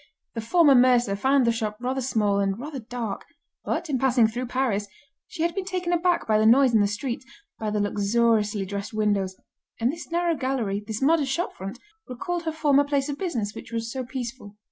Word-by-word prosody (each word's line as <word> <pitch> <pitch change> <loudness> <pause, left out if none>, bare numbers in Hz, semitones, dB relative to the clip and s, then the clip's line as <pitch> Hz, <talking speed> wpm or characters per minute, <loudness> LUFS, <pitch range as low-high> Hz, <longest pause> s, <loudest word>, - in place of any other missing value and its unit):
The 225 - -4
former 300 +5 +5
mercer 245 -4 +4
found 265 +5 +3
the 235 - +4
shop 215 -2 -3
rather 260 +2 -2
small, 210 -5 +1
and 195 0 0
rather 280 +3 -6
dark; 230 -3 -5 0.4
but, 345 - -2
in 275 -4 -1
passing 255 -3 +4
through 240 +3 -2
Paris, 235 -5 -1 0.4
she 320 - -4
had 340 0 +1
been 390 +1 -2
taken 365 -2 -2
aback 350 0 +1
by 215 -1 +3
the 215 - +3
noise 255 +2 +5
in 220 - +5
the 205 - +3
streets, 235 +5 -4 0.4
by 215 - -2
the 210 0 -1
luxuriously 210 0 +1
dressed 200 +2 -5
windows, 200 -3 0 0.4
and 235 +3 +2
this 335 +2 -9
narrow 340 0 +1
gallery, 240 -8 -2
this 220 +3 -3
modest 295 -2 +3
shop 345 +6 -2
front, 195 +5 -7 0.3
recalled 345 +7 -4
her 320 - 0
former 290 -3 +3
place 285 0 -1
of 285 - -4
business 235 - -2
which - - -10
was 230 0 -3
so 260 0 -3
peaceful. 245 -4 -7
245 Hz, 205 wpm, -25 LUFS, 215-280 Hz, 0.4 s, former